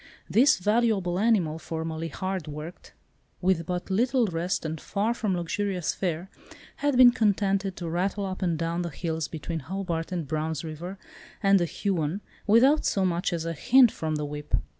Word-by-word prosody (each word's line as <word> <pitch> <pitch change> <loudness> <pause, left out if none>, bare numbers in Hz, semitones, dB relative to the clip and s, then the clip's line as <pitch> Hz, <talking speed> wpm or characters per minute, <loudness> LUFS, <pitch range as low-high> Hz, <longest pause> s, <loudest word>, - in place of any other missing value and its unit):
This 275 +7 +5
valuable 205 -3 +1
animal, 195 -8 +2
formerly 160 0 -4
hard 185 +1 -4
worked, 150 +3 -8 0.5
with 180 -3 +1
but 180 +1 -3
little 245 +5 +2
rest, 180 -1 -2
and 160 0 -4
far 210 +4 0
from 210 -6 -1
luxurious 180 +1 -1
fare, 175 -1 -2 0.5
had 290 -3 +1
been 250 -1 +9
contented 200 -3 +1
to 175 - -5
rattle 190 +4 -1
up 190 -1 -5
and 170 -3 0
down 165 +2 -1
the 170 - -3
hills 160 0 -3
between 165 +1 -5
Hobart 170 +2 -4
and 170 -5 -3
Brown's 155 +2 -2
River 170 +4 -6 0.5
and 195 0 +5
the 175 - +1
Huon, 175 0 -2 0.3
without 260 +8 +5
so 195 -2 +1
much 175 +1 0
as 165 -2 -2
a 165 - -2
hint 245 - +5
from 155 -1 -3
the 150 0 -2
whip. 150 0 -3
180 Hz, 170 wpm, -27 LUFS, 160-200 Hz, 0.5 s, been